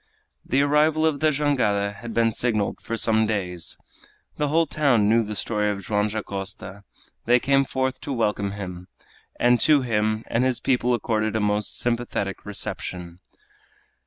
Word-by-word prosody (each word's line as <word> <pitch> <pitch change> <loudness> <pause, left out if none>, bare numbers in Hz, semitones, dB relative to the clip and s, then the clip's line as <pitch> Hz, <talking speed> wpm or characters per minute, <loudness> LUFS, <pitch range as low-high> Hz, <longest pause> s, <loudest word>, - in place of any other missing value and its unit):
The 135 +3 +2
arrival 155 +2 +3
of 155 -3 +1
the 155 - +3
jangada 125 -9 +1
had 115 +3 -8
been 115 0 +2
signaled 110 -3 -1
for 115 - -4
some 110 -1 +2
days. 90 -6 -3 0.6
The 150 - 0
whole 165 +3 +3
town 135 -10 +2
knew 115 +2 +4
the 105 0 -5
story 105 -1 0
of 100 -1 -4
Joam 105 -3 +1
Dacosta. 100 -2 -6 0.4
They 125 +2 +5
came 135 +1 +2
forth 130 0 -2
to 145 - -5
welcome 105 -5 -1
him, 90 -3 -7 0.5
and 120 0 +4
to 150 -3 +4
him 110 -2 0
and 115 - 0
his 130 -2 +1
people 125 -1 +1
accorded 110 -1 -1
a - - +2
most 105 0 -1
sympathetic 115 -5 -2
reception. 90 -3 -6
110 Hz, 160 wpm, -24 LUFS, 105-130 Hz, 0.6 s, They